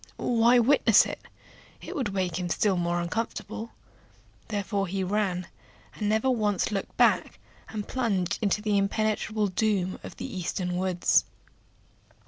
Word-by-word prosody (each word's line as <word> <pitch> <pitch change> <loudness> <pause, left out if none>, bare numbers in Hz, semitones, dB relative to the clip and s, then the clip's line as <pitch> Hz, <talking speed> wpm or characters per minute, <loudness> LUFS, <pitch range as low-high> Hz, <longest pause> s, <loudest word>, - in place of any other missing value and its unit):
Why 235 +1 +4
witness 240 -3 +5
it? - - -5 0.6
it - - -8
would 255 -8 -1
make 185 -3 -1
him 180 -1 -3
still 200 +2 +2
more 175 0 0
uncomfortable. 220 +4 -4 0.8
Therefore 200 -2 -2
he 190 +2 -2
ran, 185 -2 -1 0.5
and 210 -1 -2
never 220 +4 +1
once 215 -6 +1
looked 200 -2 -4
back, - - +3 0.3
and 210 -2 -5
plunged 200 -9 -1
into 210 0 +1
the 210 -2 +2
impenetrable 215 +1 0
gloom 190 -2 0
of - - -9
the - - -5
eastern 180 0 -3
forests. 180 0 +2
205 Hz, 135 wpm, -27 LUFS, 185-220 Hz, 0.8 s, witness